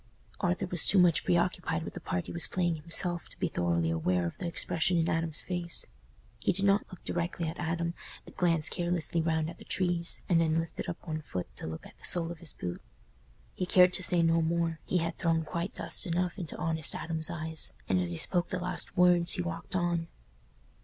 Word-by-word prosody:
Arthur 180 Hz, 0 st, 0 dB
was 175 Hz, -3 st, +2 dB
too 200 Hz, -, +10 dB
much 175 Hz, -3 st, +4 dB
preoccupied 175 Hz, -1 st, 0 dB
with -, -, -7 dB
the -, -, -6 dB
part 90 Hz, -, -3 dB
he -, -, -8 dB
was 170 Hz, -3 st, +1 dB
playing 175 Hz, -2 st, 0 dB
himself 170 Hz, +2 st, +1 dB
to -, -, -12 dB
be -, -, 0 dB
thoroughly 85 Hz, -1 st, 0 dB
aware 85 Hz, +2 st, 0 dB
of 85 Hz, -, -4 dB
the 175 Hz, -, -3 dB
expression 170 Hz, +1 st, 0 dB
in 165 Hz, 0 st, +1 dB
Adam's 165 Hz, -1 st, 0 dB
face. 175 Hz, -2 st, +2 dB, 0.5 s
He -, -, +1 dB
did 195 Hz, +2 st, 0 dB
not 200 Hz, +1 st, +3 dB
look 185 Hz, -, -12 dB
directly 170 Hz, -1 st, -2 dB
at 160 Hz, -, -6 dB
Adam, 170 Hz, 0 st, -2 dB, 0.3 s
but -, -, -14 dB
glanced 165 Hz, -3 st, +3 dB
carelessly 175 Hz, -1 st, 0 dB
round 160 Hz, -1 st, 0 dB
at 170 Hz, +1 st, -9 dB
the -, -, -11 dB
trees 175 Hz, -2 st, 0 dB
and 170 Hz, -2 st, +3 dB
then 160 Hz, -1 st, +1 dB
lifted 165 Hz, 0 st, -4 dB
up 175 Hz, -, -7 dB
one 155 Hz, -1 st, -3 dB
foot 90 Hz, -, -6 dB
to -, -, -6 dB
look 80 Hz, 0 st, -7 dB
at -, -, -16 dB
the -, -, -11 dB
sole 170 Hz, -1 st, +3 dB
of 170 Hz, -, -9 dB
his 170 Hz, -3 st, -4 dB
boot. 90 Hz, -1 st, -6 dB, 0.7 s
He 180 Hz, -, -3 dB
cared 180 Hz, 0 st, +5 dB
to -, -, +2 dB
say 180 Hz, -2 st, +2 dB
no 165 Hz, 0 st, +3 dB
more—he 165 Hz, +1 st, -1 dB
had 165 Hz, 0 st, -2 dB
thrown 165 Hz, -1 st, +1 dB
quite 170 Hz, +4 st, -4 dB
dust -, -, -1 dB
enough 180 Hz, +3 st, -1 dB
into 170 Hz, -3 st, -5 dB
honest 160 Hz, -2 st, -1 dB
Adam's 160 Hz, -1 st, -4 dB
eyes—and 160 Hz, -, -2 dB
as 90 Hz, -, -2 dB
he 85 Hz, -, -1 dB
spoke 175 Hz, -, +2 dB
the 185 Hz, -, -3 dB
last 180 Hz, -, -3 dB
words, 175 Hz, -1 st, +5 dB
he 180 Hz, -, 0 dB
walked 170 Hz, +2 st, -6 dB
on. 175 Hz, -2 st, 0 dB
170 Hz, 215 wpm, -30 LUFS, 160-175 Hz, 0.7 s, too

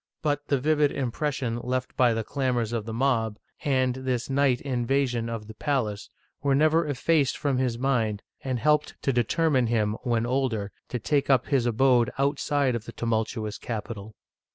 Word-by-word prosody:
But 145 Hz, -1 st, -1 dB
the 140 Hz, -, +2 dB
vivid 150 Hz, +1 st, +2 dB
impression 130 Hz, -2 st, -2 dB
left 130 Hz, +1 st, -3 dB
by 120 Hz, -3 st, +4 dB
the 115 Hz, -, -1 dB
clamors 125 Hz, -3 st, -1 dB
of 115 Hz, -3 st, -2 dB
the 115 Hz, -, -5 dB
mob, 115 Hz, -3 st, +1 dB, 0.3 s
and 130 Hz, -3 st, +2 dB
this 130 Hz, -1 st, -2 dB
night 135 Hz, -2 st, +3 dB
invasion 125 Hz, -2 st, 0 dB
of 115 Hz, -2 st, -5 dB
the 110 Hz, -, -10 dB
palace, 110 Hz, -5 st, -2 dB, 0.3 s
were 140 Hz, -1 st, +2 dB
never 155 Hz, +2 st, +3 dB
effaced 145 Hz, 0 st, +1 dB
from 140 Hz, -3 st, 0 dB
his 125 Hz, -3 st, 0 dB
mind, 115 Hz, -5 st, 0 dB, 0.2 s
and 130 Hz, -2 st, -1 dB
helped 150 Hz, +4 st, +2 dB
to 135 Hz, -, +1 dB
determine 130 Hz, +2 st, +2 dB
him, 110 Hz, -2 st, +1 dB
when 120 Hz, -2 st, 0 dB
older, 120 Hz, -5 st, -1 dB, 0.2 s
to 125 Hz, -, -2 dB
take 140 Hz, +5 st, 0 dB
up 130 Hz, -3 st, +4 dB
his 130 Hz, -4 st, +2 dB
abode 120 Hz, 0 st, +3 dB
outside 140 Hz, -1 st, +1 dB
of 115 Hz, -2 st, -4 dB
the -, -, -7 dB
tumultuous 110 Hz, -1 st, -2 dB
capital. 110 Hz, -2 st, -6 dB
125 Hz, 170 wpm, -26 LUFS, 115-140 Hz, 0.3 s, by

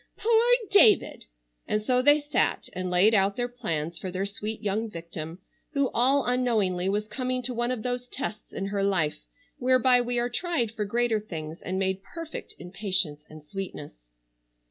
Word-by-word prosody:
"Poor 455 Hz, 0 st, +4 dB, 0.3 s
David!" 410 Hz, 0 st, +5 dB, 0.4 s
and 210 Hz, 0 st, 0 dB
so 250 Hz, +3 st, +2 dB
they 290 Hz, +3 st, +6 dB
sat 295 Hz, 0 st, 0 dB
and 185 Hz, 0 st, -3 dB
laid 180 Hz, +5 st, +5 dB
out 200 Hz, -1 st, +3 dB
their 245 Hz, 0 st, -1 dB
plans 170 Hz, -10 st, -4 dB
for 190 Hz, -, -5 dB
their 185 Hz, +2 st, -2 dB
sweet 210 Hz, +2 st, -5 dB
young 215 Hz, +2 st, -1 dB
victim, 165 Hz, -2 st, -7 dB, 0.4 s
who 280 Hz, -3 st, +1 dB
all 265 Hz, +3 st, +3 dB
unknowingly 215 Hz, -8 st, +1 dB
was 210 Hz, +2 st, -1 dB
coming 255 Hz, +1 st, -2 dB
to 250 Hz, +1 st, -3 dB
one 240 Hz, +1 st, 0 dB
of 250 Hz, -4 st, -3 dB
those 245 Hz, 0 st, -2 dB
tests 220 Hz, -5 st, -5 dB
in 195 Hz, -, -4 dB
her 200 Hz, 0 st, -1 dB
life 160 Hz, -, 0 dB, 0.3 s
whereby 255 Hz, 0 st, +4 dB
we 245 Hz, 0 st, -1 dB
are 240 Hz, 0 st, +1 dB
tried 245 Hz, -3 st, -1 dB
for 220 Hz, -2 st, -3 dB
greater 235 Hz, +1 st, +1 dB
things 160 Hz, -6 st, -7 dB
and 185 Hz, +1 st, -3 dB
made 190 Hz, 0 st, 0 dB
perfect 330 Hz, -, -8 dB
in 180 Hz, -, -10 dB
patience 185 Hz, -7 st, -1 dB
and 155 Hz, -1 st, -12 dB
sweetness. 150 Hz, -, -8 dB
215 Hz, 175 wpm, -27 LUFS, 185-250 Hz, 0.4 s, they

